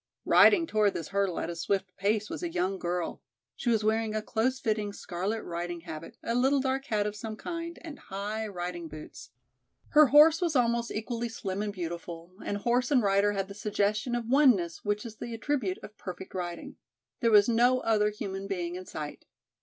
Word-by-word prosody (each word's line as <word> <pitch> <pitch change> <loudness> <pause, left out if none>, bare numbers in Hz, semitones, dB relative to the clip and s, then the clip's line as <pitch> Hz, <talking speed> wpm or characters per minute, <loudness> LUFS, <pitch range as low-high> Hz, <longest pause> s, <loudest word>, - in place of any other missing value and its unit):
Riding 340 -5 +6
toward 215 -7 +2
this 165 - -4
hurdle 195 -3 0
at - - -3
a - - -6
swift 185 +2 -2
pace 210 +2 0
was - - -6
a 345 - -2
young 190 - -1
girl; 175 -1 -3 0.3
she - - -2
was 220 -2 +2
wearing 220 0 +1
a 215 - -1
close 245 +5 0
fitting, 215 -4 -1
scarlet 200 +4 -3
riding 175 0 -4
habit, 165 -1 -8
a 230 - -1
little 265 +3 +3
dark 265 0 -1
hat 210 -5 0
of 210 0 -3
some 220 0 -6
kind 335 +6 -5
and 310 -4 -8
high 210 +3 -4
riding 175 -3 -5
boots. 155 -1 -10 0.6
Her 305 -1 +7
horse 305 +5 +7
was 335 -4 0
almost 235 -1 +2
equally 235 +2 -3
slim 200 -4 -4
and 210 -1 -2
beautiful, 170 -1 -6
and 205 - -2
horse 240 +4 +1
and 265 -5 +4
rider 200 +1 +3
had 195 -1 -2
the 200 - -8
suggestion 210 +3 0
of 240 -1 -2
oneness 240 - +3
which 205 +2 -1
is 220 -2 -8
the 235 -1 -5
attribute 225 -6 -1
of 210 - -10
perfect 185 0 -7
riding. 175 -2 -5 0.4
There 230 - +3
was 210 -2 +6
no 245 +2 +4
other 210 -2 +2
human 195 -2 -5
being 175 -3 -3
in 185 0 -7
sight. 150 -1 -7
210 Hz, 195 wpm, -29 LUFS, 185-240 Hz, 0.6 s, Her